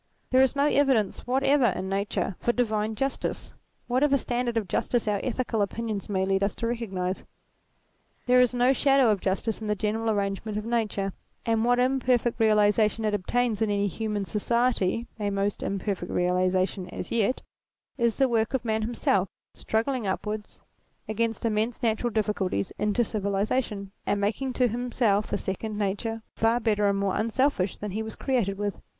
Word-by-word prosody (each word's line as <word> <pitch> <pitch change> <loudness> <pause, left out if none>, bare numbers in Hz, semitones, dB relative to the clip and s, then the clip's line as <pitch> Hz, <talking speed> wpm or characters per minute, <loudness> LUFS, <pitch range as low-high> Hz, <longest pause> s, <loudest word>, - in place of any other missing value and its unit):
There 255 +1 +6
is 265 +1 +3
no 280 +1 +3
evidence 270 -10 +2
whatever 270 +1 +3
in 190 -2 -2
Nature 195 0 -1
for 240 - +1
divine 220 -3 0
j 270 - +1
ustice, 270 - -4 0.3
whatever 275 +3 +3
standard 240 -2 -1
of 215 -4 -1
justice 235 +6 0
our 205 -1 +1
ethical 245 -3 -1
opinions 210 0 -3
may 190 -2 +1
lead 195 0 +1
us 200 0 0
to - - -3
recognize. 195 -6 -2 1.0
There 250 0 +5
is 250 - +4
no 250 +1 +3
shadow 270 -3 +4
of 200 -3 0
justice 200 +3 -1
in 215 - -4
the 210 - +1
general 220 +2 -1
arrangements 205 0 -1
of 210 - -4
Nature; 210 -4 -1 0.3
and 225 -1 +2
what 245 +1 +3
imperfect 250 -2 +1
realization 215 0 +3
it 210 - +1
obtains 220 +3 0
in 220 - +2
any 205 0 +1
human 210 0 -2
society 235 0 0
(a 205 -1 0
most 200 0 -1
imperfect 195 -2 -3
realization 185 +1 +1
as 180 - -6
yet) 235 +2 +1 0.5
is 235 -3 +1
the 270 - +3
work 225 0 +1
of 245 - -2
man 220 -1 0
himself, 215 -4 +1 0.2
struggling 230 0 -1
upwards 210 +2 -4 0.5
against 225 +1 -1
immense 220 +2 -1
natural 230 +1 +1
difficulties, 205 - -1
into 210 +3 +2
civilization, 200 0 -1 0.2
and 205 - +1
making 225 +6 -1
to 250 0 +3
himself 230 -3 0
a - - +1
second 205 +3 -4
nature, 215 +3 -2
far 225 +2 +2
better 210 -3 +2
and 200 - +1
more 195 -1 0
unselfish 230 -3 +1
than 210 -1 -5
he 215 +3 -2
was 220 0 -6
created 230 -8 0
with. 205 -1 -3
220 Hz, 170 wpm, -27 LUFS, 200-240 Hz, 1.0 s, There